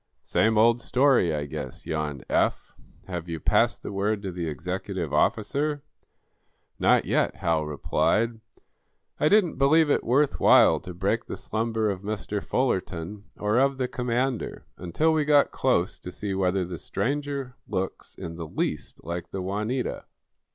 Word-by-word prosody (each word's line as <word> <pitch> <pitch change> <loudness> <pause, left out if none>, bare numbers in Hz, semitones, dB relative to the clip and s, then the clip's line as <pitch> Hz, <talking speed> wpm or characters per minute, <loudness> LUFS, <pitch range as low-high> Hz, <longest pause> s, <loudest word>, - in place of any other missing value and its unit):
"Same 110 0 +2
old 115 +2 +4
story, 130 - +3
I 75 -1 -2
guess," 65 -3 -7
yawned 75 -4 -3
Eph. - - 0 0.3
"Have 90 -2 -5
you 80 -1 -3
passed - - +2
the - - -5
word 100 +1 -1
to 95 - -3
the 85 -1 -4
executive 90 +2 -4
office?" - - +1 1.2
"Not - - +4
yet," - - +1
Hal 80 -2 0
replied. 85 +10 0 0.8
"I 150 - +3
didn't 200 -9 +3
believe 145 +2 +4
it - - +2
worth 140 +4 +2
while - - +6
to 90 -1 -9
break 100 +6 0
the - - -6
slumber 110 0 -1
of 95 -2 -5
Mr. 105 0 -3
Fullerton, 100 -5 -2
or 105 +3 +1
of 135 0 +2
the 130 -1 0
commander, 125 0 -2
until 120 - +1
we 155 -1 +2
got 145 -1 +4
close 105 -8 0
to 90 - -8
see 100 +2 -4
whether 95 -1 +1
the 85 -1 -6
stranger 140 -1 -2
looks 95 -2 -4
in 85 0 -7
the 85 -2 -5
least - - -3
like 85 0 -5
the 95 - -5
'Juanita.'" 105 +7 -2
105 Hz, 155 wpm, -26 LUFS, 90-125 Hz, 1.2 s, while